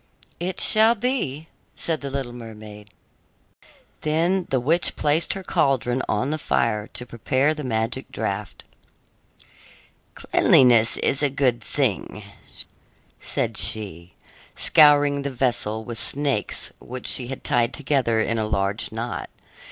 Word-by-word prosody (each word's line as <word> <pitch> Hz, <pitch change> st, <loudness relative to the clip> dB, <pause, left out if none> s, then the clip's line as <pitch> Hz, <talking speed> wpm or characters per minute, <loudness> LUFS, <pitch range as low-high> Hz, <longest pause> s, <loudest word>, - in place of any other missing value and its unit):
"It 180 Hz, +2 st, -3 dB
shall 220 Hz, +2 st, +5 dB
be," 200 Hz, -, -2 dB, 0.3 s
said 160 Hz, -2 st, -2 dB
the 140 Hz, -, -4 dB
little 135 Hz, -3 st, -4 dB
mermaid. 105 Hz, -3 st, -11 dB, 1.1 s
Then 170 Hz, +4 st, +1 dB
the 130 Hz, -, +1 dB
witch 160 Hz, +8 st, +1 dB
placed 155 Hz, +2 st, +1 dB
her 195 Hz, -, -7 dB
caldron 130 Hz, -6 st, +1 dB
on 115 Hz, +7 st, 0 dB
the 155 Hz, -, -2 dB
fire, 110 Hz, -6 st, 0 dB
to 125 Hz, -, -5 dB
prepare 130 Hz, +5 st, 0 dB
the 155 Hz, -1 st, -6 dB
magic 115 Hz, +1 st, -2 dB
draft. 105 Hz, -2 st, -4 dB, 1.5 s
"Cleanliness 120 Hz, -3 st, +4 dB
is 140 Hz, -, 0 dB
a 145 Hz, -, +3 dB
good 130 Hz, -3 st, 0 dB
thing," 110 Hz, -5 st, -2 dB, 1.0 s
said -, -, -2 dB
she, 90 Hz, -5 st, -4 dB, 0.4 s
scouring 145 Hz, -2 st, +5 dB
the 140 Hz, -, -3 dB
vessel 120 Hz, -4 st, -1 dB
with 115 Hz, -1 st, -5 dB
snakes 140 Hz, -1 st, -1 dB
which 125 Hz, 0 st, -8 dB
she 125 Hz, -, +1 dB
had 135 Hz, -, -7 dB
tied 120 Hz, -4 st, +1 dB
together 130 Hz, -6 st, 0 dB
in 115 Hz, +1 st, 0 dB
a 110 Hz, -, 0 dB
large 100 Hz, 0 st, -1 dB
knot. 115 Hz, +2 st, -5 dB
130 Hz, 130 wpm, -23 LUFS, 110-145 Hz, 1.5 s, shall